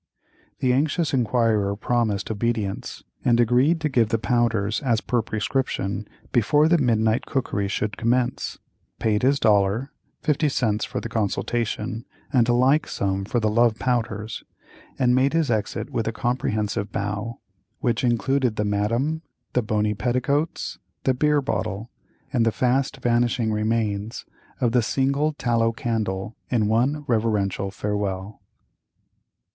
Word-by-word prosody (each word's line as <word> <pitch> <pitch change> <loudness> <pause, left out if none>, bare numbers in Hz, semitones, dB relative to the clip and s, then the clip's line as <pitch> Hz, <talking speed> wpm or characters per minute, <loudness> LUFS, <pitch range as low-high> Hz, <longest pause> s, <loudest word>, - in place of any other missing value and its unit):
The 125 -1 +3
anxious 150 +4 +1
inquirer 115 -5 +2
promised 110 -2 0
obedience, 110 -2 -2 0.2
and 120 -1 +3
agreed 125 +8 +3
to 155 - +1
give 120 -6 +2
the 115 - +2
powders 115 -2 +1
as 120 -6 +2
per 120 +1 0
prescription, 105 -3 -2 0.2
before 145 +7 +4
the 170 0 +4
midnight 110 -3 +2
cookery 105 -6 -1
should 105 +2 -2
commence, 120 +2 0 0.4
paid 105 -2 +1
his 140 +3 +3
dollar 105 +4 +2 0.3
(fifty 150 0 +2
cents 110 -6 0
for - - -4
the - - -4
consultation 115 +1 -2 0.3
and 120 -3 +4
a - - +4
like 130 +5 +3
sum 95 0 -1
for 120 - 0
the 110 - +1
love 115 +1 +3
powders), 110 -3 -2 0.5
and 125 -1 +3
made 130 +3 +3
his 165 -5 +2
exit 110 -2 -2
with 115 -2 -1
a - - +1
comprehensive 110 -3 -1
bow, 105 +3 -3 0.4
which 120 0 0
included 125 0 +1
the 105 - 0
Madame, 115 +10 0 0.3
the 125 - +3
bony 105 -1 0
petticoats, 125 +8 -1 0.2
the 130 - +3
beer 150 +2 +2
bottle, 110 -4 -3 0.4
and 120 -4 +3
the 115 - +3
fast 130 +3 +1
vanishing 120 -1 +1
remains 105 0 -1 0.3
of 120 -2 +2
the 125 0 +3
single 140 +6 +1
tallow 115 -4 +1
candle 110 -3 -2
in 110 -4 +2
one 130 +7 +1
reverential 105 -5 0
farewell. 100 0 -3
115 Hz, 140 wpm, -24 LUFS, 105-125 Hz, 0.5 s, before